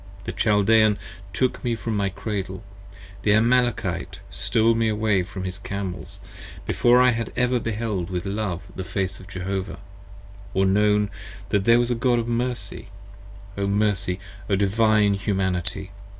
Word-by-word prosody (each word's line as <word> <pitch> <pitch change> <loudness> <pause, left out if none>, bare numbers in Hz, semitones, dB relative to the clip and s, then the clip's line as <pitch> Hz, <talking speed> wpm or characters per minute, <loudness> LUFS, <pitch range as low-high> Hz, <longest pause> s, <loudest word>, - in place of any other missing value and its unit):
The - - -4
Chaldean 105 0 +4 0.3
took 130 -1 -1
Me 120 -2 0
from 115 -1 -3
my 100 -1 +1
Cradle. 95 -1 -4 0.6
The 105 - +3
Amalekite 120 +2 +1
stole 115 0 +2
me 115 -1 +1
away 105 -2 +2
upon 95 +1 -6
his 95 +1 -5
Camels, 95 -4 -5 0.5
Before 120 +1 +4
I 125 0 +6
had 115 0 -3
ever 125 0 +2
beheld 110 -5 -2
with 90 -2 -3
love 95 -3 -2
the 95 - -4
Face 95 0 -3
of 95 - -13
Jehovah: 95 0 -4 0.8
or 95 +1 +3
known 105 +1 +3 0.4
That 100 -1 +1
there 115 0 +6
was 120 0 +1
a - - +4
God 120 +1 +2
of 115 0 -1
Mercy: 120 -4 -3 0.7
O 100 0 -1
Mercy, 100 -2 +1 0.3
O 100 - +3
Divine 105 +1 +3
Humanity! 95 -1 -2
105 Hz, 150 wpm, -24 LUFS, 95-115 Hz, 0.8 s, I